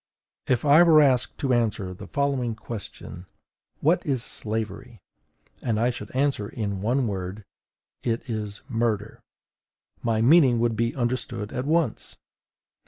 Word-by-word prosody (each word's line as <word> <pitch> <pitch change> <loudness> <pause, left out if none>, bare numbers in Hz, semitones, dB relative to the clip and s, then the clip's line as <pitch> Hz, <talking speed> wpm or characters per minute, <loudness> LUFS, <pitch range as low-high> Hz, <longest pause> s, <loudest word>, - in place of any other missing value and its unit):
If 130 +2 +1
I 145 +3 +7
were 165 -3 +7
asked 130 -4 +3
to 135 -3 +1
answer 105 -6 0
the 90 - -10
following 135 -5 -1
question: 100 -5 -8 0.5
WHAT 170 +4 +3
IS 135 -7 -1
SLAVERY? 110 0 -4 0.6
and 110 -3 0
I 120 +2 +2
should 105 -3 -8
answer 130 -7 0
in 100 -4 -3
one 125 +5 +1
word, 95 0 -5 0.6
IT 115 +2 -2
IS 105 -3 -4
MURDER, 115 -4 -1 0.8
my 115 -2 0
meaning 130 0 +6
would 115 -1 +1
be 115 +1 0
understood 120 -4 -2
at 125 - -2
once. 160 +1 0
120 Hz, 135 wpm, -25 LUFS, 105-135 Hz, 0.8 s, I